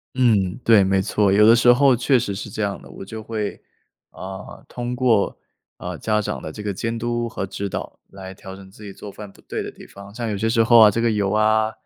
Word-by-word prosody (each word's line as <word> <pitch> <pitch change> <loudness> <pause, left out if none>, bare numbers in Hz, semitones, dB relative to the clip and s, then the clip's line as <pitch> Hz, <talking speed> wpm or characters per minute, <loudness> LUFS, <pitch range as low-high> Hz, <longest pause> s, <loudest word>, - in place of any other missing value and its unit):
嗯， 105 -8 +2
对， 110 -4 +5
没 95 0 +1
错， 100 -1 +1
有 105 +2 +5
的 115 +1 +7
时 120 +1 +5
候 135 0 +4
确 130 +2 +2
实 105 -4 -2
是 95 - -6
这 110 - -4
样 100 -1 -3
的。 - - -15
我 95 - -10
就 110 +2 -8
会， 110 -2 -5 0.5
啊， 95 +1 -9
通 120 0 -5
过， 120 -5 +1 0.4
呃， - - -6
家 105 -1 0
长 105 - -4
的 - - -7
这 105 - -9
个 100 -1 -2
监 115 +4 -3
督 120 0 -2
和 95 - -4
指 100 +1 -5
导， - - -6
来 95 -1 -10
调 95 0 -11
整 95 -1 -14
自 105 - -15
己 100 - -8
做 100 +1 -10
饭 105 -1 -10
不 - - -23
对 - - -5
的 - - -5
地 - - -14
方。 100 +1 -13
像 120 -2 -4
有 - - -2
些 110 +2 0
时 115 0 +3
候 115 0 +6
啊 110 - +9
这 110 +3 -2
个 115 -1 +2
油 100 -2 0
啊， 110 +1 +2
105 Hz, 270 characters per minute, -21 LUFS, 100-115 Hz, 0.5 s, 啊